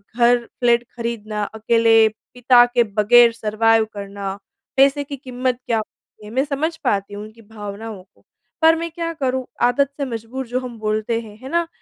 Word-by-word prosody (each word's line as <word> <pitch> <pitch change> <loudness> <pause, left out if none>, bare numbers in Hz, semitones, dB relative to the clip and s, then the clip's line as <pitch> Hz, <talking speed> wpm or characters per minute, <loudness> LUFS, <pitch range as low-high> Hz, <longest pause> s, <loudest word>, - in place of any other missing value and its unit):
घर 240 0 +3
फ्लैट 240 -1 +3
ख़रीदना, 215 -3 -4
अकेले 225 +1 +3 0.3
पिता 245 0 +5
के 245 0 +2
बग़ैर 225 +3 +5
सरवाइव 225 0 +2
करना। 200 -1 -6 0.4
पैसे 275 +2 +4
की 280 0 -7
कीमत 255 -1 -3
क्या 230 -2 0
होती 215 0 -9
है? 210 - -10
मैं 260 +3 +1
समझ 305 +3 -2
पाती 200 0 -1
हूँ 205 +1 -6
उनकी 220 +2 -13
भावनाओं 210 -1 -8
को, 190 - -33 0.4
पर 325 0 +6
मैं 335 +1 -4
क्या 335 0 -4
करूँ 260 -4 -2 0.2
आदत 250 +3 +3
से 280 - -2
मजबूर 235 +2 -6
जो 250 +2 -1
हम 250 -2 -8
बोलते 215 +2 -1
हैं। 215 -2 -13
है 265 - -8
ना? 340 +1 0
235 Hz, 180 wpm, -20 LUFS, 215-255 Hz, 0.4 s, पर